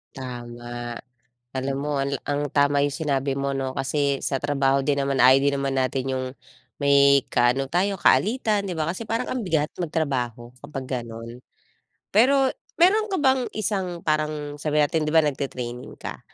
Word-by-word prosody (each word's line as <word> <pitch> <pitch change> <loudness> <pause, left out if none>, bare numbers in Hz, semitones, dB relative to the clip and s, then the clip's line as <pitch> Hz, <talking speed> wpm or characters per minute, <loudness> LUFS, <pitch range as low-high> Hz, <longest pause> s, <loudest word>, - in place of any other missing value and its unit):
Tama. 120 -1 -7 0.6
Alam 135 +1 -2
mo, 145 0 -2
al 140 -1 -1
ang 145 -1 -1
tama 145 0 +3
'yung 145 - 0
sinabi 140 -3 -1
mo, 140 0 -2
'no. 130 -1 -2
Kasi 140 +1 0
sa 135 - -1
trabaho 135 -1 +1
din 140 -1 +1
naman, 140 0 0
ayaw 130 +1 +7
din 140 0 +2
naman 135 0 -1
natin 130 0 0
'yung 130 0 -2 0.5
may 140 -1 +5
kaano 125 +3 +3
tayo 190 +6 0
kaalitan, 210 0 +2
di 175 - -4
ba, 155 - 0
kasi 210 - -6
parang 230 - -1
ang 255 - -2
bigat 160 -5 +1 0.2
magtrabaho 125 -7 -2
kapag 145 -2 -6 0.2
gano'n. 115 +1 -9 0.7
Pero 265 +5 +5 0.3
meron 420 +5 +4
ka 380 - 0
bang 265 -2 +3
isang, 190 -5 -2
parang 150 -1 -1
sabihin 150 -1 +2
natin 160 +1 -1
di - - 0
ba, 165 - +5
nagti-training 130 -3 -4
ka, - - -7
140 Hz, 165 wpm, -24 LUFS, 135-160 Hz, 0.7 s, ayaw